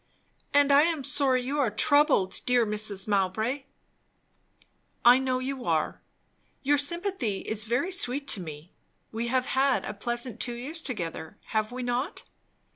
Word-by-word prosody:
"And 285 0 +4
I 280 +1 +7
am 320 -3 0
sorry 260 -2 +2
you 280 +4 -2
are 265 -5 +2
troubled, 220 - +2
dear 245 -2 +4
Mrs. 210 -2 -1
Mowbray!" 215 +7 0 1.4
"I 245 +2 +8
know 260 -1 0
you 260 0 -4
are. 160 -2 0 0.6
Your 290 +1 +3
sympathy 290 - 0
is 220 0 +1
very 245 - 0
sweet 280 -5 0
to - - +2
me. 155 -1 -9 0.4
We 230 +2 -3
have 255 +1 +1
had 270 0 +1
a - - -4
pleasant 240 +4 -4
two 240 -1 -2
years 295 +7 -5
together, 170 - -5
have 215 0 -1
we 250 0 -5
not?" 245 +6 -2
250 Hz, 150 wpm, -27 LUFS, 215-280 Hz, 1.4 s, I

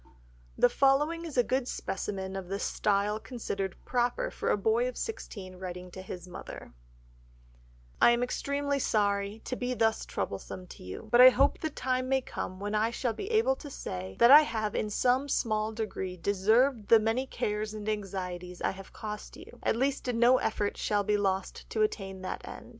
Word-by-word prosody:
The - - +6
following 290 +6 +2
is 310 -5 -7
a 245 - +6
good 255 +1 0
specimen 190 -3 -4
of 190 -2 -5
the 195 +2 -2
style 205 +1 0
considered 200 -6 -4
proper 250 - 0
for - - -3
a - - +3
boy 455 +2 +2
of - - -5
sixteen, 195 - -6
writing 180 0 -7
to 185 - -8
his 185 -1 -8
mother— 180 - -9 1.3
"I - - +8
am 240 +1 +3
extremely 280 +2 -1
sorry 205 -2 0
to 255 - -3
be 250 0 -2
thus 225 -1 +1
troublesome 140 - -5
to - - -12
you, 90 - -8
but 240 - +7
I 255 - +12
hope 275 +3 +2
the 315 - -2
time 255 -2 -1
may 265 0 +3
come 185 -6 -6
when 205 +1 -3
I 215 +1 +2
shall 235 0 -2
be 390 - -6
able 460 +3 +3
to 295 - -9
say 95 - -6
that 235 - +7
I 295 +2 +11
have 220 -8 -2
in 215 - -1
some 255 +6 +1
small 215 -4 0
degree 195 -4 -4
deserved 210 +6 +2
the 230 - +7
many 225 +5 0
cares 210 -2 -2
and 210 0 -7
anxieties 180 -4 -4
I - - 0
have 195 0 -11
cost 210 -1 -7
you, - - -13
at - - +1
least 265 +2 0
no 240 +2 +5
effort 205 -1 -1
shall 205 -1 +1
be 210 +1 +1
lost 195 -2 -2
to 220 - +1
attain 195 -3 -3
that 185 - -4
end. - - -9
215 Hz, 190 wpm, -30 LUFS, 195-255 Hz, 1.3 s, I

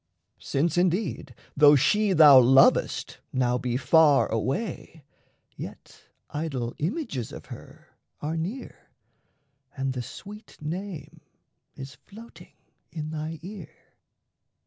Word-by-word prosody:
Since, 160 +5 -1
indeed, 175 - -1 0.2
Though 145 0 +7
she 210 +8 +2
thou 150 -5 +8
lovest 130 +2 +3
now 125 -1 0
be 125 0 -2
far 145 +2 +4
away, 145 - -4 0.5
Yet - - -11 0.3
idol 135 -6 -4
images 155 - -3
of - - -10
her - - -13 0.3
are 155 +2 -3
near 185 +11 -6 0.9
And 135 0 -2
the 125 - -4
sweet 205 - -11
name 170 +2 -7 0.5
is 135 +1 -9
floating 225 +3 -15 0.4
in 155 -2 -6
thy 160 +1 -5
ear. 190 -2 -10
155 Hz, 105 wpm, -26 LUFS, 135-180 Hz, 0.9 s, thou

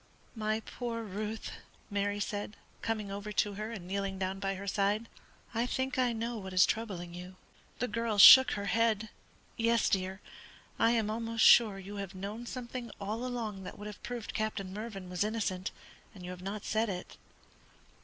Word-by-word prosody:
"My 215 0 -1
poor 230 0 -4
Ruth!" 215 +2 -4 0.4
Mary 205 0 0
said, 205 +1 -3 0.2
coming 215 -3 -2
over 205 +1 -5
to 205 0 +1
her 215 +2 -4
and 190 -6 -7
kneeling 195 0 -2
down 190 0 -2
by 195 0 -1
her 195 +1 -7
side. 205 +3 +1 0.5
"I 235 +2 0
think 260 +1 -1
I 250 -1 +3
know 230 0 -3
what 190 -2 -7
is 185 0 +7
troubling 185 -6 -3
you." 180 +1 -9 0.4
The 250 - -1
girl 230 -1 -1
shook 260 +7 +11
her 200 - -3
head. 220 0 +1 0.5
"Yes, 230 -1 +3
dear, 190 0 0 0.6
I 225 - +5
am 225 -3 +1
almost 230 0 +1
sure 215 -5 +7
you 195 +1 -8
have 195 -1 -5
known 210 +5 -6
something 245 -1 -5
all 215 +4 -3
along 230 -6 -3
that - - -8
would 205 - -8
have 210 -1 -8
proved 240 -2 -5
Captain 205 -3 -2
Mervyn 205 -3 -6
was 180 +1 -1
innocent, 205 -4 -1 0.5
and 180 -2 -9
you 180 - -5
have 180 0 -8
not 200 +2 -5
said 220 +1 +1
it." 180 -2 -5
210 Hz, 180 wpm, -32 LUFS, 195-230 Hz, 0.6 s, shook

